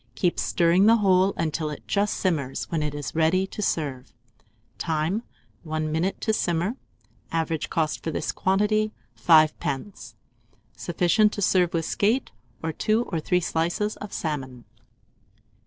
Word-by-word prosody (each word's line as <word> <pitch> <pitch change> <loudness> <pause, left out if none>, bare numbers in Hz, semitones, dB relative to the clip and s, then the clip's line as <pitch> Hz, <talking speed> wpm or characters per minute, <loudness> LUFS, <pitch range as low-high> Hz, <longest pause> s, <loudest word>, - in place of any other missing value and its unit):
Keep 175 -2 0
stirring 175 +4 +3
the 230 - +7
whole 190 -3 +3
until 155 -1 -1
it 150 - -8
just 205 0 +1
simmers, 145 -8 -1
when 165 -2 0
it 150 -1 -2
is 145 -1 -5
ready 165 +4 +2
to 200 - -7
serve. 140 -9 -2 0.7
Time. 165 +6 -1 0.4
1 155 -1 -3
minute 170 +5 -1
to 220 - +1
simmer. 175 +3 0 0.6
Average 165 -1 -1
cost 155 -2 -1
for - - -2
this 155 - -2
quantity, 210 +3 +1 0.3
5d. 155 +1 +2 0.6
Sufficient 180 +5 +2
to 205 - -4
serve 180 -2 +2
with 165 -1 0
a - - -4
skate, 225 +6 +1 0.3
or 160 0 -2
2 215 +8 +1
or 165 - 0
3 180 +3 +1
slices 175 +5 -1
of 210 - -8
salmon. 130 -6 -4
170 Hz, 145 wpm, -25 LUFS, 155-200 Hz, 0.7 s, the